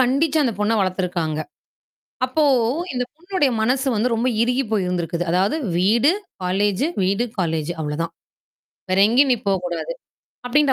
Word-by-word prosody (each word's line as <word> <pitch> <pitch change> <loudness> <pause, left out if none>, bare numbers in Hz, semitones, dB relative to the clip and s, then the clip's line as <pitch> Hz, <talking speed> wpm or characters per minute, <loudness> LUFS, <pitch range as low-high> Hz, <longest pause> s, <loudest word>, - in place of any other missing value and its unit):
கண்டிச்சு 280 +5 +2
அந்தப் 230 -6 -1
பொண்ண 210 +2 +2
வளர்த்துருக்காங்க. 180 -4 -1 0.9
அப்போ, 300 +4 +1 0.5
இந்தப் 250 -1 -3
பொண்ணோட 355 -2 0 0.2
மனசு 260 +4 +1
வந்து 235 +3 +1
ரொம்ப 235 +3 +1
இறுகி 250 +3 +1
போய் 205 -4 +1
இருந்திருக்கு. 175 -1 -2
அதாவது 190 - +2 0.2
வீடு, 230 - +4 0.3
காலேஜ், 200 +5 +1 0.2
வீடு, 195 +5 +1
காலேஜ் 160 -3 -1
அவ்ளோதான். 160 +3 -3 0.8
வேற 185 - +2
எங்கயும் 260 +3 +4
நீ - - +3
போகக் 190 -2 0
கூடாது 175 - -3 0.5
அப்படின்ற 280 +2 +3
210 Hz, 140 wpm, -21 LUFS, 180-260 Hz, 0.9 s, வீடு